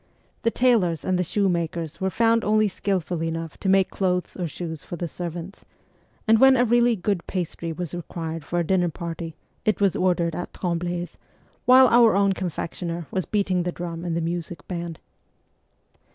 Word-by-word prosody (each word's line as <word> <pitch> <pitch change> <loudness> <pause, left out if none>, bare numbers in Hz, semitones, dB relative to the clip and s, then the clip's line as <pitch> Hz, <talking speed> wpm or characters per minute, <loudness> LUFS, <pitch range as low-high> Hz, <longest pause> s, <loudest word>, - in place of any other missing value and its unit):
The 230 - +2
tailors 225 - +2
and 185 -1 +1
the - - +2
shoe 200 +3 +1
makers 170 -1 -2
were 190 - +1
found 230 +4 +2
only 215 0 +3
skilful 185 -4 -2
enough 165 0 -4
to 195 - -1
make 190 -1 +4
clothes 180 -2 -1
or 180 -2 -2
shoes 160 -2 -6
for - - -6
the 175 0 -3
servants, 175 +2 -6 0.6
and 220 0 +6
when 265 +1 +7
a 245 - +4
really 240 0 +4
good 195 -2 -2
pastry 170 -2 -3
was 170 0 -5
required 165 -2 -5
for 175 - -3
a 175 - +2
dinner 175 +1 +2
party 165 0 -6 0.3
it 215 - +1
was 200 -3 +3
ordered 175 -2 +1
at 175 - -5
Tremble's, 175 0 -3 0.5
while 255 +1 +8
our 235 -3 +6
own 200 0 +3
confectioner 170 -1 -4
was 185 -2 -1
beating 195 -4 +1
the 175 0 -1
drum 170 -1 -6
in 170 -2 -2
the 170 - 0
music 170 +1 -4
band. 170 -2 -4
175 Hz, 180 wpm, -24 LUFS, 170-200 Hz, 0.6 s, while